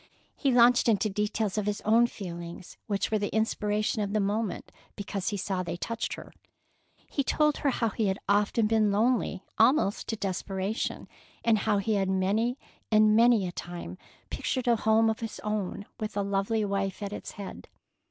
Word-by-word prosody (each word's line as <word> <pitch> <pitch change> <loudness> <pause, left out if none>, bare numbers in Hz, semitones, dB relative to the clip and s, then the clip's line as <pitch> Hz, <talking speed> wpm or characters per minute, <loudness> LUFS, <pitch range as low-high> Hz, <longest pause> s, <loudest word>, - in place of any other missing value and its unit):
He 275 - +1
launched 245 0 +5
into 215 -1 +2
details 210 0 -1
of 205 - -3
his 210 0 -1
own 230 +3 +4
feelings 175 -4 -8
which 200 -1 -1
were 215 - +2
the 205 - -1
inspiration 215 -1 0
of 200 0 -2
the 215 - +2
moment, 205 +1 -2 0.2
because 200 -1 -3
he 205 - -3
saw 190 -1 -2
they 170 -1 -4
touched 230 +5 -3
her. - - -10 0.7
He 280 - -2
told 300 +2 +2
her 285 - +1
how 230 -3 0
he 215 +1 -1
had 190 0 0
often 205 +2 +2
been 215 -1 +3
lonely 215 -3 +1
almost 225 -2 +3
to 225 - -1
desperation, 195 +1 -3 0.4
and 225 -2 +4
how 210 - +4
he 200 +2 0
had 195 -2 +1
many 205 +7 +1 0.3
and 215 0 +5
many 230 -4 +5
a - - -4
time 175 - -7 0.3
pictured 255 -1 -2
a 235 - +5
home 220 0 +3
of 220 0 0
his 225 -1 -6
own, 210 -2 -3
with 215 -2 -4
a 200 - +1
lovely 200 +2 0
wife 195 0 -2
at 200 0 -4
its - - -7
head. 200 -1 -8
210 Hz, 180 wpm, -28 LUFS, 195-225 Hz, 0.7 s, launched